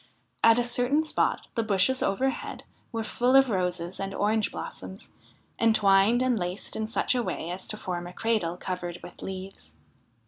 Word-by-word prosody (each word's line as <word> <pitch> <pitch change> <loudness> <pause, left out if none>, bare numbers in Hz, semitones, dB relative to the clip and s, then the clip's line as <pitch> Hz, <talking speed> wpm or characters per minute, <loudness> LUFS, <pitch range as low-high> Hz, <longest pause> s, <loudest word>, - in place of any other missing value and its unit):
At 230 0 +7
a 245 - +3
certain 245 +6 +2
spot 310 - 0
the 230 - 0
bushes 220 +4 +2
overhead 260 +7 -1 0.3
were 225 -2 -2
full 245 +4 +1
of 270 -2 +6
roses 180 -2 -1
and 195 0 -4
orange 215 +1 +1
blossoms, - - -8 0.5
entwined 220 +1 +4
and 250 -4 +2
laced 180 +2 -4
in 220 0 -2
such 230 - +1
a 250 - +1
way 175 -6 -3
as 185 +1 -7
to 215 - -4
form 175 -3 -4
a 175 - -9
cradle 195 -7 0
covered 180 -1 -4
with - - -11
leaves. 185 - -8
210 Hz, 170 wpm, -27 LUFS, 185-240 Hz, 0.5 s, At